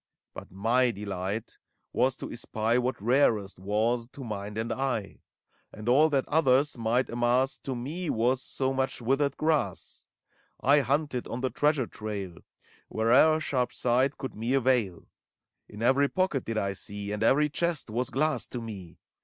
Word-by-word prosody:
But - - -10
my 115 +7 +2
delight 100 0 -4 0.3
was 130 0 +2
to - - -7
espy 115 +1 0
What 125 -1 -2
rarest 110 -4 +2
was, 110 +5 0
to 140 - -8
mind 105 -2 -5
and 110 +1 -1
eye; 130 -7 -3 0.5
And 110 +1 -9
all 145 +6 +5
that 140 -3 0
others 145 -2 +3
might 120 +2 0
amass 120 +3 +1
To 135 - -4
me 155 +8 -4
was 125 +3 +1
so 135 0 -1
much 130 -1 -1
withered 135 +4 0
grass. 155 -3 -1 0.5
I 145 +3 +5
hunted 140 -1 -1
on 125 - -5
the 130 -1 -1
treasure 145 -3 +2
trail 100 -5 -6 0.5
Where'er 130 +8 +4
sharp 130 -5 -1
sight 130 +3 +1
could 130 -4 -5
me 115 +5 -1
avail: 120 -9 +1 0.6
In 105 +2 -7
every 135 +3 +4
pocket 185 -8 0
did 115 -1 -3
I 100 -2 0
see. 100 0 -5
And 105 - -3
every 145 +6 +4
chest 165 -5 -1
was 120 +2 -1
glass 155 +3 0
to 125 - -5
me. 100 -7 -8
125 Hz, 160 wpm, -28 LUFS, 110-135 Hz, 0.6 s, all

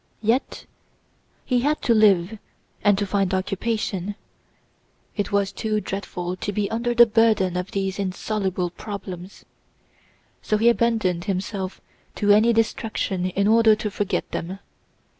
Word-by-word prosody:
Yet 235 +6 0 0.8
he 250 -2 +2
had 295 +5 +1
to 235 - +3
live 210 -2 +3 0.4
and 205 -2 +4
to 205 - 0
find 195 -1 0
occupation. 195 0 -2 1.0
It 205 -2 -2
was 200 -1 +1
too 215 +2 -1
dreadful 185 -3 -5
to 205 - -3
be 205 0 -2
under 240 +1 -1
the 240 0 +8
burden 220 -5 +2
of 180 +1 -3
these 195 0 -2
insoluble 190 -2 -2
problems, 190 -2 -8 1.0
so 215 - 0
he 230 +2 +4
abandoned 220 -7 +1
himself 190 -1 -3 0.3
to 205 -1 +2
any 215 +3 +5
distraction 220 -4 -1
in 200 +2 0
order 220 0 +5
to 210 -1 -4
forget 200 -2 -2
them. 180 +3 -4
205 Hz, 135 wpm, -23 LUFS, 190-220 Hz, 1.0 s, the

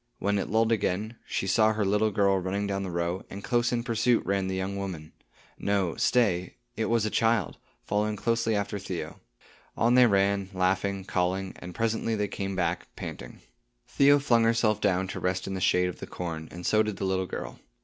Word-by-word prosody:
When 100 0 0
it - - -3
lulled 110 +2 +2
again, 110 +1 -1
she - - -2
saw 110 +3 +3
her 105 -2 0
little 105 +2 +2
girl 100 -2 +2
running 95 +3 -2
down 100 -1 -2
the 95 - -4
row, 85 +1 -2
and 100 +1 -8
close 120 +1 +1
in 120 -1 0
pursuit 115 0 +1
ran 100 -1 0
the 95 - -2
young 95 +1 -2
woman. 90 -6 -6 0.5
No, 100 -4 0
stay. 95 -8 +1 0.2
It 110 - -1
was 115 -1 +1
a 110 - -1
child, 115 -4 +1 0.3
following 105 +1 0
closely 115 +1 0
after 100 0 -2
Theo. 95 -3 -6 0.6
On 120 +1 +3
they 125 -1 +7
ran, 100 -1 +2
laughing, 95 +1 0
calling, 95 0 -1
and 90 -1 -9
presently 115 0 0
they 105 -1 -1
came 95 0 -4
back, 85 -1 -1
panting. - - -8 0.5
Theo 140 +1 +5
flung 120 -5 +3
herself 115 -2 +2
down 95 -2 +1
to - - -5
rest 90 0 -1
in 95 - -4
the 95 - -4
shade 90 0 +3
of 90 - -8
the - - -7
corn, 80 -3 -5
and 85 +2 -9
so 110 - +4
did 105 -3 -2
the 95 - -2
little 95 -1 0
girl. - - -6
100 Hz, 200 wpm, -27 LUFS, 95-110 Hz, 0.6 s, they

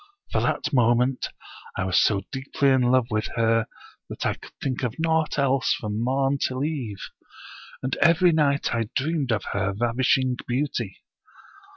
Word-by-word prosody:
From - - +1
that 145 - -1
moment, 125 +1 +2 0.5
I - - 0
was 95 -1 +3
so 100 -2 +2
deeply 135 +1 0
in 130 -1 +4
love 125 0 +3
with 110 +1 0
her 115 -1 +2 0.4
that - - -5
I - - +2
could - - -14
think 130 -2 -2
of 125 -2 -2
naught 160 -1 +1
else 135 -2 +2
from 105 +1 -3
morn 135 +2 +1
till 130 0 -1
eve; 130 -10 -4 0.7
and 130 +1 -1
every 170 +1 +5
night 145 -5 +1
I 115 -2 -1
dreamed 140 -1 0
of 110 -2 0
her 95 -1 0
ravishing 125 +2 +2
beauty. 125 -5 -2
130 Hz, 160 wpm, -25 LUFS, 115-140 Hz, 0.7 s, every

